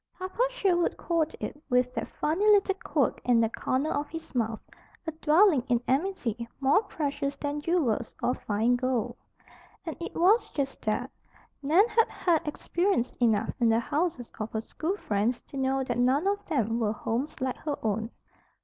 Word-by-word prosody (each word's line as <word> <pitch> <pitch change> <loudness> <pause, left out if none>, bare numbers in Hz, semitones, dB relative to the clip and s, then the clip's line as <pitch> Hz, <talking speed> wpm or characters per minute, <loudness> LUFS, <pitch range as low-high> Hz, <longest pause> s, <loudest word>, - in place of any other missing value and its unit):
Papa 370 +5 -4
Sherwood 380 -8 +1
called 325 -2 0
it, 295 - -6
with 250 0 +2
that - - -3
funny 330 +7 -1
little 405 -2 +5
quirk - - 0
in 245 -2 +4
the 225 -1 +3
corner 260 +6 -1
of 290 +1 -2
his 325 -3 -8
mouth, 225 -3 -1 0.4
"a 320 - -2
dwelling 320 0 +4
in 240 -1 +3
amity, 255 - -1
more 280 +8 +4
precious 290 -8 -3
than 290 +1 -3
jewels 295 -9 0
or 250 - +2
fine 220 +3 +1
gold." 255 -3 -1 0.7
And 325 - -4
it 340 - -5
was 420 +6 +4
just 275 -2 -2
that. 245 +5 -1 0.5
Nan 330 +10 +4
had 455 0 +3
had 330 -4 0
experience 340 -3 0
enough 225 -3 +2
in 235 -2 +4
the 225 0 +4
houses 290 -1 -2
of 215 +1 -4
her 220 - -1
school 330 - -3
friends 220 - 0
to - - -14
know 265 0 +1
that 245 -2 -2
none 260 +7 +3
of 405 +1 0
them 235 -7 0
were 215 -2 +1
homes 235 +8 -3
like 260 -1 -2
her 295 -2 -3
own. 220 +1 0
275 Hz, 175 wpm, -28 LUFS, 235-340 Hz, 0.7 s, little